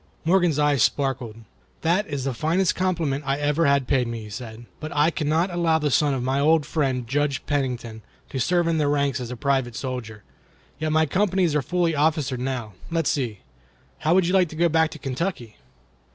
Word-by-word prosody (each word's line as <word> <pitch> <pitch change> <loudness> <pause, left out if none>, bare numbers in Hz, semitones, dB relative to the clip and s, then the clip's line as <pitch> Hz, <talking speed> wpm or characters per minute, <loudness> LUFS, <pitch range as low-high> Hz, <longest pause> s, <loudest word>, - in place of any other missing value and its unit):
Morgan's 175 -3 +3
eyes 145 -3 +2
sparkled. 130 -6 0 0.5
"That 180 +6 +1
is 140 -3 -3
the 135 -1 -1
finest 165 +8 +1
compliment 165 -6 -1
I 135 0 0
ever 150 +2 +1
had 140 -2 +2
paid 130 -4 +2
me," 115 -1 -5
he 105 - -10
said, 110 +2 -8
"but 155 0 -6
I 150 +3 +4
cannot 160 +4 0
allow 170 -2 +2
the 150 -2 -1
son 145 +2 +3
of 125 - -3
my 130 +2 0
old 155 +1 +3
friend 130 -6 -1
Judge 140 +1 -1
Pennington 125 -6 -2 0.3
to 135 - -3
serve 175 +6 +2
in 165 -1 +1
the 150 - +2
ranks 140 -2 +1
as 125 -2 -5
a 125 - -6
private 135 -3 0
soldier. 115 -6 -5 0.6
Yet 155 0 -1
my 160 +1 +3
companies 185 0 +1
are 150 - +2
fully 175 +2 0
officered 145 -3 +1
now. 125 -5 -3 0.2
Let's 165 -2 +1
see! 120 -8 -3 0.6
How 160 +4 +2
would 190 -2 +4
you 180 - 0
like 185 -3 +4
to 155 - -9
go 170 +2 +2
back 160 0 +3
to 155 - -9
Kentucky?" 135 - -4
145 Hz, 200 wpm, -24 LUFS, 130-165 Hz, 0.6 s, I